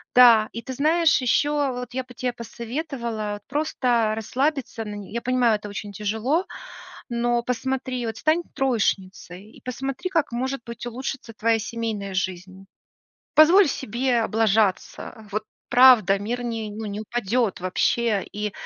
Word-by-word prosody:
Да, 235 -3 +7
и 230 - -5
ты 260 - -6
знаешь, 310 +1 +3
еще 290 +4 +2 0.2
вот 250 -1 -6
я 260 0 -2
бы 250 0 -14
те 250 -1 -2
посоветовала 235 -4 -5
просто 250 -6 +1
расслабиться 255 +1 -2
на 210 0 -6
я 235 +1 -4
понимаю, 250 -3 +2
это 205 0 -9
очень 205 0 -6
тяжело, 220 - -1 0.6
но 240 0 +1
посмотри, 255 0 -2
вот 225 - -4
стань 320 +3 +2
троечницей, 200 -6 -2
и - - -17
посмотри 270 +7 -4
как, 325 -8 +1
может 260 +2 -2
быть, 235 0 -7
улучшится 245 -1 -5
твоя 225 +1 +2
семейная 215 -3 -4
жизнь. 190 +1 -4 0.7
Позволь 335 +3 +7
себе 245 -1 0
облажаться, 220 0 0
вот 215 +1 -2 0.2
правда, 240 -7 +6
мир, 240 +5 -3
не 225 -3 -3
ну, 215 +1 -6
не 205 +1 -4
упадет 225 -2 -1
вообще, 205 +3 +1
и 210 -1 -3
235 Hz, 140 wpm, -24 LUFS, 215-255 Hz, 0.7 s, Да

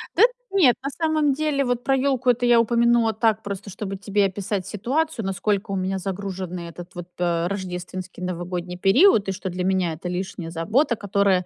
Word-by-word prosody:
Да - - +6 0.3
нет, 340 -12 +5
на 275 - -1
самом 310 -2 +1
деле, 285 -1 0
вот 245 -1 -1
про 270 - +2
ёлку- 265 -1 +1
это 245 0 +2
я 240 -1 +6
упомянула 235 0 +3
так, 220 0 +1
просто 200 0 -6
чтобы 195 +1 -5
тебе 200 0 +1
описать 195 0 -3
ситуацию, 260 +3 -1
насколько 195 +2 -1
у - - -1
меня 190 0 -1
загруженный 185 -2 -5
этот 175 +3 -10
вот 175 -1 -7
пэ 170 -1 0
рождественский 185 -1 -6
новогодний 180 0 -4
период, 205 - +5
и 195 - 0
что 190 0 -4
для 180 +1 -3
меня 185 -3 +1
это- 180 +3 -6
лишняя 180 -2 -4
забота, 220 - +1
которая 200 -3 +1
200 Hz, 185 wpm, -23 LUFS, 180-240 Hz, 0.3 s, Да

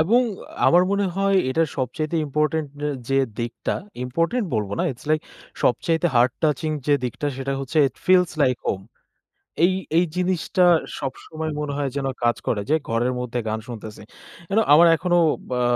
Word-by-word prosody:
এবং 225 +10 +4 0.5
আমার 175 +1 +6
মনে 200 -1 +1
হয় 195 0 +2
এটা 160 +5 +2
সবচাইতে 150 +5 -2
ইম্পোর্টেন্ট 150 +1 0 0.2
আ - - 0 0.2
যে, 135 0 +2 0.2
দিকটা, 120 0 -3 0.3
ইম্পোর্টেন্ট 165 - 0
বলব 105 -3 -1
না। - - +1
ইটস 120 - -16
লাইক 155 0 +3 0.4
সবচাইতে 165 +6 +2
হার্ট 120 +1 +4
টাচিং 155 +1 +1 0.2
যে, 145 - +4
দিকটা, 125 +4 -3
সেটা 135 +1 -3
হচ্ছে, 135 +4 -2
ইট - - -22
ফিলস 180 -2 +5
লাইক 130 -2 +3
হোম। 95 - -1 0.8
এই 185 - +4 0.3
এই 175 - +4
জিনিসটা 180 0 +1 0.3
সবসময় 155 +3 -5
মনে 150 -1 -3
হয় 140 -2 -1
যেন 135 -1 -1 0.2
কাজ 120 0 +2
করে 105 - 0
যে, - - +5
ঘরের 120 +2 +1
মধ্যে 125 0 -3
গান 110 - -1
শুনতেছি। 110 -3 -8 0.5
you 195 - -3
know 225 - +4
আমার 165 +4 +8
এখনো 175 0 +1 0.4
আ - - +2
150 Hz, 170 wpm, -23 LUFS, 125-175 Hz, 0.8 s, আমার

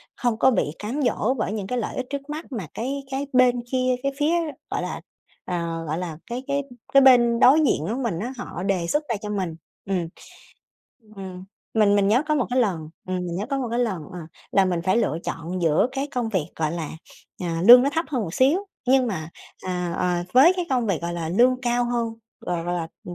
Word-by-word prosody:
không 240 -3 0
có 265 - +5
bị 150 - 0
cám 235 +8 -3
dỗ 250 -2 +1
bởi 215 -5 -2
những 205 -3 -4
cái 250 - -2
lợi - - -4
ích 255 - -3
trước 280 +1 -5
mắt 310 +2 -5
mà 215 -10 -4
cái 275 +4 -3
cái 275 +1 -2
bên 250 -1 +4
kia, 255 -1 +2
cái 275 - +1
phía, 300 +3 +2 0.4
gọi - - -1
là, - - -4 0.4
ờ, 170 -2 -3
gọi 155 +2 -2
là, 170 -4 -5
cái 245 +2 -5
cái 280 0 0 0.3
cái 275 - +8
bên 240 -3 +6
đối 275 +5 +7
diện 160 - +1
á 220 +7 -2
mình 195 -9 -1
á 240 +6 -4
họ 215 -7 -6
đề 190 -4 0
xuất 295 - +1
ra 230 - +1
cho 210 - -5
mình. 190 -6 -2 0.3
Ừm. 185 -4 -1 1.1
Ừm. 185 -1 -8 0.3
Mình 210 -2 +4
mình 200 -1 +3
nhớ 235 +6 +4
có 305 - +3
một 275 - +1
cái 255 - +2
lần 175 -9 -1 0.2
ừm, 185 - -1
mình 175 -1 -3
nhớ 205 - -3
có 275 +1 -2
một 250 -3 -2
cái 235 - -1
lần, 210 -10 -1
ờ, 180 - -7 0.3
là 195 - +5
mình 175 -2 -1
phải 185 +3 +2
lựa 170 -8 +1
chọn 175 +3 -4
giữa 160 +5 +3
cái 270 +1 -2
công 250 -5 -2
việc, 185 -8 -1
gọi 155 -1 0
là, 165 -3 -4 0.5
à, 165 -1 -2
lương 245 +1 +11
nó 280 - +1
thấp 325 +3 -1
hơn 260 -6 -1
một 170 -3 -5
xíu 275 +7 +4 0.3
nhưng 260 0 +4
mà, 160 -8 -4 0.3
à, 180 -2 -3
ờ, 175 -1 0
với 275 +8 +7
cái 355 -2 -2
công 245 -3 +1
việc, 185 -5 -1
gọi 170 0 -2
là, 165 -2 -3
lương 250 +8 +3
cao 240 0 +1
hơn, 235 -2 -1 0.3
gọi 175 -2 -3
gọi 175 +1 -1
là, 165 -2 -3 0.2
ừm, 175 - -7
220 Hz, 235 wpm, -24 LUFS, 175-255 Hz, 1.1 s, lương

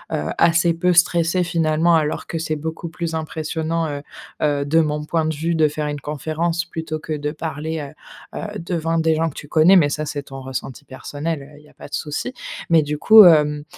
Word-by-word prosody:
heu, 75 - -3
assez 170 0 +4
peu 180 +2 +1
stressé 175 +1 +3
finalement 165 -1 +1
alors 155 -2 -1
que 165 - -4
c'est 155 -1 -2
beaucoup 160 +2 -5
plus 165 0 -4
impressionnant, 160 +1 -2
heu 145 -1 -5 0.4
heu, 145 -1 +1
de 160 +3 +3
mon 150 -1 0
point 160 0 0
de 160 0 -1
vue, 165 +3 -1
de 160 -2 +3
faire 150 0 -4
une 145 -1 -4
conférence 160 +4 -2
plutôt 160 -2 -5
que 155 0 -5
de 150 -1 -3
parler, 160 0 -4 0.5
heu - - -5
heu, 210 0 -6
devant 165 -1 -2
des 160 0 +2
gens 165 +1 0
que 145 - -14
tu 145 - -9
connais, 160 +5 +5
mais 160 -6 +5
ça, 150 +1 -3
c'est 145 -1 -4
ton 135 -1 -9
ressenti 130 +1 -6
personnel, 145 +4 -5
heu, 145 +1 -15
il 150 - -20
y - - -19
a - - -22
pas - - -11
de - - -19
souci. 155 - -3 0.4
Mais 165 -1 +6
du 150 0 -3
coup, 215 +6 +8
hem, 150 -3 +4
160 Hz, 220 wpm, -21 LUFS, 150-165 Hz, 0.5 s, coup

